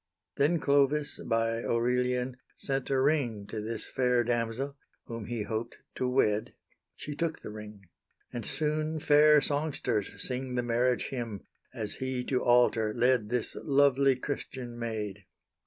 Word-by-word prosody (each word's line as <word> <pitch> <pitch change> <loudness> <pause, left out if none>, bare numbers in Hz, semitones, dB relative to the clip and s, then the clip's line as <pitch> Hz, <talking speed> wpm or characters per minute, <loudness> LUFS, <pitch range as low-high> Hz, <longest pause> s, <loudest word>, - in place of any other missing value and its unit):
Then 160 +4 +3
Clovis, 145 +1 +2
by 115 0 0
Aurelian, 125 +1 0 0.2
sent 135 -1 -2
a 135 -1 +2
ring 130 -7 +1
To 105 +1 -5
this 110 0 -3
fair 125 -2 +2
damsel, 120 +4 -1 0.3
whom 115 -3 -6
he 120 -2 -2
hoped 110 +3 -4 0.2
to 130 - -1
wed; 110 -5 +1 0.4
She 145 - -6
took 165 +1 -2
the - - -6
ring; 105 -1 -9 0.5
and 120 - -4
soon 155 +4 -1
fair 150 0 +6
songsters 140 -8 -1
sing 125 0 -3
The 125 - 0
marriage 120 +1 +1
hymn, 115 -6 -5 0.3
as 110 -5 -4
he 130 -1 -2
to 125 0 0
altar 120 -3 +3
led 125 -3 +2
This 120 -1 -1
lovely 140 -1 +4
Christian 125 -2 -5
maid. 105 -4 -4
125 Hz, 140 wpm, -30 LUFS, 115-140 Hz, 0.5 s, fair